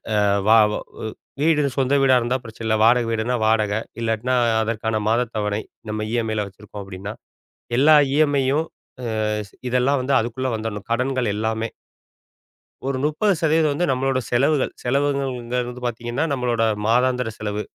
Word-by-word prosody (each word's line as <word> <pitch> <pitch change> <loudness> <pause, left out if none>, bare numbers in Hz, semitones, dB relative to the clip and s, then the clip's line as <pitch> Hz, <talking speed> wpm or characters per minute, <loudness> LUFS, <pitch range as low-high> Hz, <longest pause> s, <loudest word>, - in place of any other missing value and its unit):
அ - - +3 0.3
வா 115 - +8 0.2
ஒ - - -3 0.2
வ் 110 - -4 0.3
வீடு 155 0 +3 0.2
சொந்த 135 +1 +1
வீடா 135 -1 +5
இருந்தா 120 +2 0
பிரச்சனை 115 0 -9
இல்ல, 110 0 +2
வாடகை 120 0 +4
வீடுனா 115 +2 0
வாடகை, 110 -1 +2 0.2
இல்லாட்டினா 115 +3 0 0.3
அதற்கான 110 0 -1
மாத 120 +2 +2
தவணை. 105 0 -1 0.3
நம்ப 110 0 -3
இ.எம்.ஐலாம் 110 -3 -1
வச்சுருக்கோம் 100 +1 -10
அப்படீன்னா. 95 +2 -7 0.6
எல்லா 150 +4 +6 0.2
இ.எம்.ஐயும் 145 0 +2 0.4
அ - - -4 0.4
ஸ் - - -22 0.2
இதெல்லாம் 125 +3 +2
வந்து 135 +2 0
அதுக்குள்ள 120 +3 -2
வந்துடணும். 110 -2 -5
கடன்கள் 130 +1 0
எல்லாமே. 110 +1 -1 1.2
ஒரு 135 -1 -1
30% 160 -2 +2
வந்து, 175 +5 0
நம்மளோட 135 0 0
செலவுகள். 135 +3 +2
செலவுங்கள்ங்கறது 125 -2 -1
வந்து 125 0 -9
பார்த்தீங்கன்னா, 120 +3 -3
நம்மளோட 120 -3 0 0.2
மாதாந்திர 125 +1 +2
செலவு. 105 -1 -3
120 Hz, 140 wpm, -22 LUFS, 110-135 Hz, 1.2 s, வா